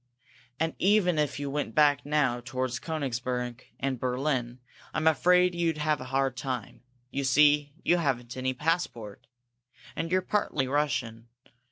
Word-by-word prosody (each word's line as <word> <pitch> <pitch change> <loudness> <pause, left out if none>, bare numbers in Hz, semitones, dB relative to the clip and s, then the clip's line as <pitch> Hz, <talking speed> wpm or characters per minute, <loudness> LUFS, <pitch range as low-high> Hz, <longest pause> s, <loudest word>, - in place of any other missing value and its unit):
And, 160 0 0
even 185 -4 +3
if 145 -1 -1
you 140 -1 -3
went 145 -5 -3
back 145 -2 +4
now 145 -5 +1
toward 130 0 -2
Koenigsberg 125 -5 -3 0.2
and 135 -2 -2
Berlin, 125 -1 -1 0.4
I'm 155 - 0
afraid 180 +3 +4
you'd 170 -2 0
have 150 -2 0
a - - -6
hard 135 0 0
time. 130 -5 -5 0.3
You 140 - -2
see, 145 +1 +4
you 175 - +3
haven't 125 -7 -1
any 130 0 -2
passport. 125 - -2 0.7
And 165 +1 -3
you're 185 0 +2
partly 155 -10 0
Russian. 125 -5 -1
140 Hz, 145 wpm, -28 LUFS, 125-155 Hz, 0.7 s, back